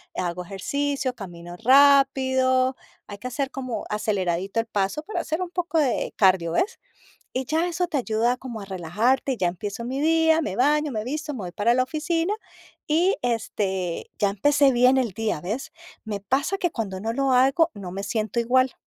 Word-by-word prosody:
hago 180 0 -3
ejercicio, 270 +7 -2
camino 175 -4 -9
rápido, 260 0 +4 0.3
hay 205 - -8
que 250 - -6
hacer 270 +2 -2
como 255 -6 -5
aceleradito 195 -1 -1
el 225 - -1
paso 200 +7 -1
para 380 -4 -3
hacer 320 +2 -3
un 365 - -3
poco 345 -2 -1
de 270 -5 0
cardio, 185 -4 +3
¿ves? 430 - 0 0.5
Y 260 - -2
ya 320 +6 0
eso 355 +1 -1
te 310 -5 -1
ayuda 235 +1 +1
como 245 -3 -7
a - - -7
relajarte, 210 - 0
ya 185 - 0
empiezo 205 +5 -5
mi 260 +3 -3
día, 320 +1 +4
me 190 - -3
baño, 295 +3 +2
me 215 -2 -3
visto, 295 +2 -4
me - - -6
voy 180 -2 -6
para 210 +5 +2
la 255 0 +3
oficina, 330 +7 -1 0.5
y, 340 +6 +3
este, 200 -7 -2
ya 200 -1 +2
empecé 280 +7 +3
bien 250 +2 +5
el 235 -7 0
día, 215 -6 -2
¿ves? 240 - -4 0.3
Me 210 -2 -3
pasa 275 - 0
que 350 -3 0
cuando 195 -5 -4
no 225 +3 -2
lo 275 +2 0
hago, 270 +6 +4
no 190 -4 -7
me 195 +1 -4
siento 215 +2 -1
igual. 255 +2 +2
250 Hz, 185 wpm, -24 LUFS, 205-285 Hz, 0.5 s, bien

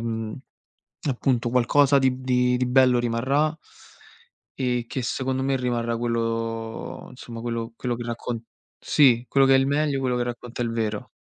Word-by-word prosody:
mhmm, 115 -1 -3 0.8
appunto 125 -2 0
qualcosa 135 +3 +4
di 130 -1 +1
di 125 -1 +2
di 125 - 0
bello 125 0 +4
rimarrà 130 +7 +1 1.0
e 125 -2 0
che 130 - -3
secondo 130 +2 -2
me 135 0 +1
rimarrà 120 -2 -1
quello 115 -1 -3
insomma, 120 -2 -9
quello 115 -1 -4
quello 125 0 -2
che 120 - -6
raccont 115 0 -4 0.4
sì, 125 -5 +4
quello 135 -1 +4
che 135 - +5
è - - +6
il 135 - +2
meglio, 145 -1 +1
quello 125 -2 0
che 125 - 0
racconta 120 0 -5
il 115 - -1
vero. 110 -2 -2
125 Hz, 160 wpm, -24 LUFS, 115-130 Hz, 1.0 s, è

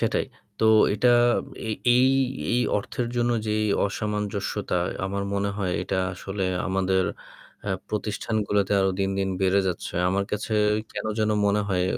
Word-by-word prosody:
সেটাই। - - 0 0.3
তো - - +1 0.3
এটা 115 +4 +2 0.6
এ - - 0 0.3
এই 125 - +5 0.5
এই 125 - +3 0.2
অর্থের 120 +4 -4
জন্য 120 0 +2 0.2
যেই 110 0 +1 0.2
অসামঞ্জস্যতা 105 -1 -2 0.3
আমার 100 +1 -2
মনে 100 0 0
হয় 95 -3 -1
এটা 95 - -2 0.2
আসলে 95 +1 -4 0.2
আমাদের 95 0 +1 0.6
আ - - 0 0.2
প্রতিষ্ঠানগুলাতে 105 -1 -1
আরও 95 0 +2
দিন, 95 0 +1
দিন, 95 0 0
বেড়ে 95 +1 +3
যাচ্ছে। 90 - -4
আমার 100 +2 0
কাছে 105 +1 -2 0.4
কেন - - -4
যেন 110 0 +2 0.2
মনে 100 +1 +2
হয় 90 -2 +1
100 Hz, 145 wpm, -25 LUFS, 95-105 Hz, 0.6 s, এই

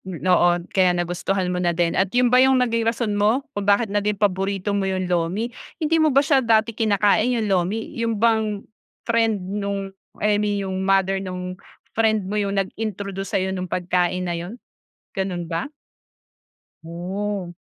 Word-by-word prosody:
Hmm, 185 -2 -6
oo. 180 -1 +5 0.2
Kaya 180 -2 +3
nagustuhan 180 +1 -1
mo 180 - -1
na 175 -1 0
din 170 -1 +1
at 190 0 +1
'yon 245 +3 +2
ba 255 - +7
'yong 265 0 +5
naging 230 -2 +1
rason 230 -2 -2
mo 215 +7 +2
kung 205 0 -2
bakit 205 +4 +4
na 205 - +2
din 210 0 -1
paborito 195 0 0
mo 195 -1 0
'yong 185 -1 -1
lomi? 180 +7 -1 0.2
Hindi 320 0 +1
mo 310 - +4
ba 275 0 +3
siya 280 -3 +4
dati 225 -1 +2
kinakain, 215 +1 +2
'yong 225 - -1
lomi, 195 +3 0
'yon 230 -1 -1
bang, 220 -2 +1 0.4
friend 225 -2 +2 0.2
no'ng 200 -1 -3 0.3
eh, 210 -1 +3
mi 205 -1 0
'yong 190 0 -3
mother 195 0 +2
no'ng 180 -1 -5 0.4
friend 220 -3 +2
mo 195 - -5
'yong 200 -1 -1
nag-introduce 200 -2 -5
sa'yo 190 0 -1
no'ng 185 -1 -4
pagkain 180 +1 0
na 175 - -2
'yon, 175 +7 -6 0.6
gano'n 185 -3 -3
ba? 165 - -3 1.1
Oh. 180 +2 -4
200 Hz, 175 wpm, -22 LUFS, 185-220 Hz, 1.1 s, ba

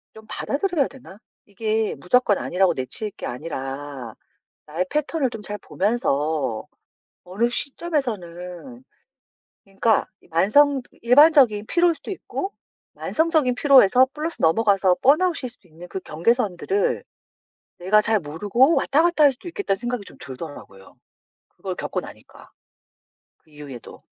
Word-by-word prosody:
좀 220 - -13
받아들여야 305 -1 -1
되나?' 245 -7 -14 0.3
이게 215 +1 -2
무조건 210 +1 +2
아니라고 180 -1 +1
내칠 135 - -1
게 - - -9
아니라 135 -2 -6 0.5
나의 165 +5 -2
패턴을 300 -2 -1
좀 225 - -7
잘 210 0 -5
보면서 155 - -1 0.6
어느 195 +6 0
시점에서는 240 - -3 0.8
그러니까 200 +3 +1 0.2
이 - - -24
만성 260 - +3 0.2
일반적인 250 -4 +5
피로일 345 0 +3
수도 280 - -10
있고 390 +1 -5 0.4
만성적인 315 -6 +1
피로에서 260 -3 +6
플러스 315 +2 -4
넘어가서 190 +1 +3
번아웃일 305 -2 +2
수도 210 -7 -16
있는 165 +3 -12
그 190 - -5
경계선들을 235 - 0 0.8
내가 205 +4 +3
잘 220 0 +2
모르고 205 - +2
왔다 300 +4 +2
갔다 345 -3 +3
할 280 - +6
수도 255 - -13
있겠다는 330 - -2
생각이 240 0 -4
좀 - - -13
들더라고요, 130 - -10 0.5
그걸 - - -7
겪고 - - -3
나니까. - - -14 0.9
그 155 - -30
이후에도. 145 -5 -11
215 Hz, 310 characters per minute, -23 LUFS, 175-280 Hz, 0.9 s, 피로에서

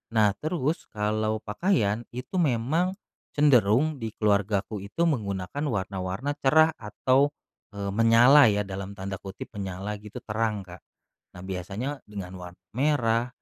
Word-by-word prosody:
Nah, 105 -2 +5
terus 155 -1 -2
kalau 110 +1 -1
pakaian, 110 - 0
itu 125 +9 -3
memang 160 +6 +1 0.4
cenderung 140 +1 +4
di 110 -2 -5
keluargaku 105 0 0
itu 100 - -2
menggunakan 105 - -1
warna-warna 95 +2 -2
cerah 155 +4 +5
atau, 130 +7 +1 0.4
eee, 100 -1 -3
menyala 115 +5 +7
ya, 105 -1 +2
dalam 100 0 -6
tanda 95 -1 -5
kutip, 95 +1 -9
"Menyala," 100 0 -5
gitu, 105 0 -10
"terang," 105 -1 -1
Kak. 90 -1 -12 0.6
Nah, 90 - -9
biasanya 95 +9 -4
dengan 100 -3 -7
war 90 0 -9 0.2
merah, 120 -3 +1
110 Hz, 130 wpm, -26 LUFS, 100-135 Hz, 0.6 s, menyala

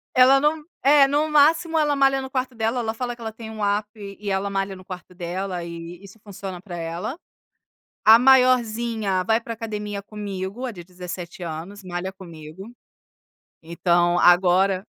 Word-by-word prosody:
Ela 260 +2 +6
não, 300 +2 0 0.2
é, 280 0 +6
no 295 +3 +1
máximo 320 +3 +3
ela 295 -2 +2
malha 270 -1 +3
no 265 - -7
quarto 255 -1 -3
dela, 225 +2 -1
ela 220 -2 -2
fala 240 +1 -4
que 235 - -16
ela 220 -1 -4
tem 220 0 -10
app 205 +1 0 0.3
e 205 -1 -5
ela 195 +1 -1
malha 195 0 -2
no 185 - -13
quarto 185 -1 -10
dela 180 +1 -4
e 170 +2 -9
isso 200 +3 -14
funciona 195 -3 -8
para 190 -3 -8
ela, 170 - -5 0.9
a 220 +1 +9
maiorzinha 235 -6 +3
vai 225 +3 +2
para 230 - -7
academia 210 -3 -5
comigo, 200 +2 -6
a 255 - -2
de 175 - -10
17 180 0 -8
anos, 170 +5 -7
malha 180 +1 -4
comigo, 175 +3 -11 0.9
então 175 +1 +1
agora 185 +2 +4
205 Hz, 165 wpm, -23 LUFS, 180-245 Hz, 0.9 s, a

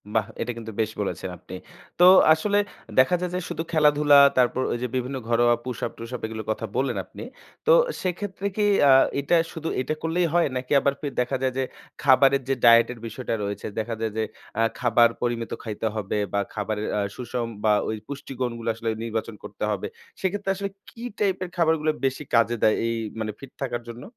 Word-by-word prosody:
বাহ! 110 -3 +2
এটা 120 - -2
কিন্তু 115 -1 -7
বেশ 110 0 -1
বলেছেন 95 -1 -3
আপনি। - - -10 0.4
তো - - +6 0.3
আসলে 205 +6 0 0.4
দেখা 130 +8 +5
যায় 180 - -1
যে - - 0
শুধু - - -3
খেলাধুলা 150 -2 +5 0.2
তারপর 125 0 +3
ওই - - -1
যে - - 0
বিভিন্ন 130 +1 -2
ঘরোয়া 120 0 +4
পুশ 125 -2 -5
আপ - - -4
টুশ 115 0 -8
আপ - - -7
এগুলোর 110 -1 -6
কথা 115 - -3
বললেন 130 -5 0
আপনি। - - -10 0.4
তো 470 - +5 0.3
সেক্ষেত্রে 190 +2 -3
কি 210 - +2 0.3
আ - - +8 0.3
এটা 140 +5 +2 0.2
শুধু 160 0 -5
এটা 140 - -2
করলেই 170 +2 +1
হয় 175 -1 +4
নাকি 125 0 -5
আবার 140 0 +1
পে 150 - -3
দেখা 125 +2 0
যায় 130 -1 +1
যে 135 - +1 0.4
খাবারের 135 0 +5
যে - - +3
ডায়েটের 115 +1 +6
বিষয়টা 115 +2 -4
রয়েছে, 100 0 -4
দেখা 115 +1 -3
যায় 110 -1 -1
যে 110 - +1 0.3
অ্যা 115 - +3 0.2
খাবার 120 -1 +4
পরিমিত 120 -1 -2
খাইতে 110 0 -3
হবে 105 -1 -2 0.2
বা 100 - +2
খাবারের 105 0 -3
আ - - +1
সুষম 120 -1 -3 0.2
বা 105 -1 +4 0.2
ওই 110 - -1
পুষ্টি 140 -1 -7
গুণগুলো 115 -2 -2
আসলে 115 0 -3
নির্বাচন 115 -1 -3
করতে - - -7
হবে। - - -2 0.3
সেক্ষেত্রে 195 +1 -2
আসলে 200 +1 -3 0.2
কি 230 - -12 0.2
টাইপের 190 -3 0
খাবারগুলো 160 -2 +2
বেশি 135 +2 -1
কাজে 115 0 +3
দেয় 110 - +5
এই 115 - -1 0.2
মানে 110 -1 -2
ফিট 135 -1 -11
থাকার 120 -2 -3
জন্য? 120 +1 -8
125 Hz, 195 wpm, -25 LUFS, 115-150 Hz, 0.4 s, আ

